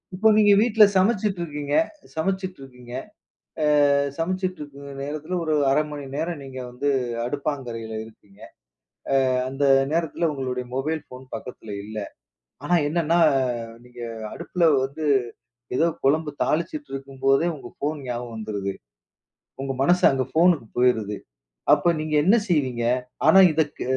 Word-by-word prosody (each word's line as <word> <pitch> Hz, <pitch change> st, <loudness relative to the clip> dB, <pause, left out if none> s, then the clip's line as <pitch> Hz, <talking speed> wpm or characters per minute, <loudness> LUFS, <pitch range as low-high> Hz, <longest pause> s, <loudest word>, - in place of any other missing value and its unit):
இப்போ 220 Hz, +4 st, +3 dB
நீங்க 205 Hz, -1 st, +6 dB
வீட்டில 220 Hz, -1 st, +5 dB
சமைச்சிட்டு 195 Hz, -1 st, +2 dB
இருக்கீங்க 145 Hz, -2 st, -3 dB, 0.4 s
சமைச்சிட்டு 185 Hz, +1 st, -2 dB
இருக்கீங்க. 125 Hz, -2 st, -12 dB, 1.0 s
ஆ -, -, +4 dB, 0.3 s
சமைச்சிட்டு 185 Hz, +1 st, -2 dB
இருக்க 140 Hz, -1 st, -9 dB
நேரத்தில, 155 Hz, +4 st, -5 dB
ஒரு 155 Hz, -1 st, 0 dB, 0.2 s
1/2 150 Hz, +3 st, +3 dB
மணி 145 Hz, -1 st, -6 dB
நேரம் 165 Hz, -1 st, -3 dB
நீங்க 130 Hz, -1 st, -8 dB
வந்து 135 Hz, +4 st, -2 dB, 0.4 s
அடுப்பாங்கரையில 125 Hz, -5 st, -4 dB
இருக்கீங்க. 105 Hz, -2 st, -19 dB, 0.9 s
ஆ -, -, +1 dB, 0.2 s
அந்த 135 Hz, +2 st, -2 dB, 0.3 s
நேரத்தில 165 Hz, 0 st, 0 dB
உங்களுடைய 130 Hz, -2 st, -3 dB
மொபைல் 155 Hz, +4 st, -1 dB
ஃபோன் 130 Hz, +1 st, -11 dB
பக்கத்தில 110 Hz, -4 st, -8 dB
இல்ல, 110 Hz, 0 st, -7 dB, 0.7 s
ஆனா 175 Hz, -, +3 dB
என்னென்னா, 170 Hz, +1 st, +1 dB, 0.7 s
நீங்க 125 Hz, -1 st, -12 dB, 0.3 s
அடுப்பில 175 Hz, -2 st, -3 dB, 0.2 s
வந்து, 150 Hz, +3 st, -6 dB, 0.7 s
ஏதோ 165 Hz, -, +4 dB, 0.2 s
குழம்பு 150 Hz, +2 st, +2 dB
தாளிச்சிட்டு 290 Hz, -, -2 dB
இருக்கும்போதே 135 Hz, +3 st, +1 dB
உங்க 140 Hz, -, -10 dB
ஃபோன் 150 Hz, +1 st, -2 dB
ஞாபகம் 120 Hz, -1 st, -4 dB
வந்துருது, 100 Hz, -3 st, -3 dB, 0.9 s
உங்க 135 Hz, 0 st, -2 dB
மனசு 175 Hz, +5 st, +3 dB
அங்க 130 Hz, -1 st, 0 dB
போனுக்கு 165 Hz, -7 st, +4 dB
போய்ருது, 110 Hz, -5 st, +2 dB, 0.6 s
அப்ப 150 Hz, +4 st, +4 dB
நீங்க 155 Hz, 0 st, -3 dB
என்ன 200 Hz, +6 st, +5 dB
செய்வீங்க? 130 Hz, -8 st, 0 dB, 0.4 s
ஆனா 160 Hz, +5 st, +7 dB
இதுக்கு 155 Hz, -1 st, -1 dB
145 Hz, 130 wpm, -24 LUFS, 125-170 Hz, 1.0 s, ஆனா